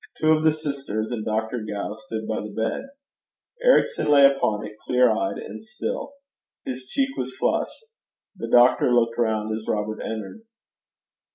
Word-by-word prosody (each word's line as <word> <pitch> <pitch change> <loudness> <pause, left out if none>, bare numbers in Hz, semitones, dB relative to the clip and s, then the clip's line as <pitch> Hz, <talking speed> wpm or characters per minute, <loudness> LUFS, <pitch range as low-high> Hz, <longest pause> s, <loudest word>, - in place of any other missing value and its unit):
Two 155 0 +4
of 155 0 +3
the 160 - +5
sisters 140 -8 -3
and 115 -3 -3
Dr. 110 +2 -1
Gow 105 -1 -4
stood 110 -2 -6
by 110 - -2
the 105 - -6
bed. 110 - -3 0.7
Ericson - - +4
lay 145 -2 +7
upon 110 -6 +2
it, 105 0 -9
clear 125 +1 +4
eyed, 100 -2 -1
and - - -8
still. 280 - -5 0.5
His 130 0 -5
cheek 270 - -1
was - - -4
flushed. 455 - -1 0.5
The 145 - -5
doctor 120 +1 +5
looked 115 -1 +2
round 110 -2 0
as 110 0 -7
Robert 105 0 -2
entered. 110 - -5
120 Hz, 160 wpm, -24 LUFS, 110-150 Hz, 0.7 s, lay